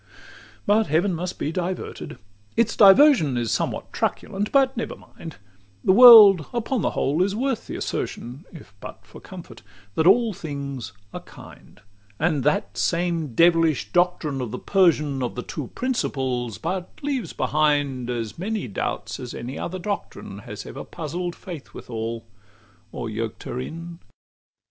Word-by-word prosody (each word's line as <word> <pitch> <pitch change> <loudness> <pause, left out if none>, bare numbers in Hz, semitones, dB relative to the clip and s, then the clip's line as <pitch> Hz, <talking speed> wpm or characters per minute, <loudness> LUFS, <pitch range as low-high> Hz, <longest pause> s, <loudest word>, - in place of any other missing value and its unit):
XLI - - -33 0.6
But 215 +2 +3
heaven 175 +5 +1
must 175 +2 -4
be 150 - -2
diverted; 180 +1 -5 0.4
its 225 -1 +2
diversion 200 - +6
Is 120 -2 -1
sometimes - - -1
truculent 205 +2 -2
but 270 -1 +3
never 235 - -4
mind: 165 -2 -12 0.5
The - - +4
world 210 - +9
upon 240 0 -1
the - - +1
whole 145 +6 +1
is 195 +2 +1
worth 260 0 -2
the - - -6
assertion 125 +6 -5
(If 155 - -13
but - - -10
for - - -14
comfort) - - -11 0.3
that 160 +7 +2
all 230 +2 +5
things 140 - -6 0.2
are - - -5
kind: - - -15 0.4
And 155 -4 0
that 100 -9 0
same 165 -6 -1
devilish 165 -3 +3
doctrine 175 -6 +1
of 125 - -4
the - - -5
Persian, 150 -8 +2
Of 125 - -3
the 125 - -4
two 145 -5 -6
principles, 130 - -2
but 185 -1 -4
leaves 265 - -2
behind 145 -5 0
As 115 +1 -4
many 210 - -3
doubts 100 - -4
as 125 -2 -7
any 125 +3 -6
other 185 - -4
doctrine 200 +2 -5
Has - - -9
ever - - -8
puzzled 175 +3 -5
Faith 170 -7 -10
withal, 115 0 -5 0.7
or - - -5
yoked 110 0 -5
her 125 - -5
in. 165 +5 -7
165 Hz, 155 wpm, -23 LUFS, 135-195 Hz, 0.7 s, world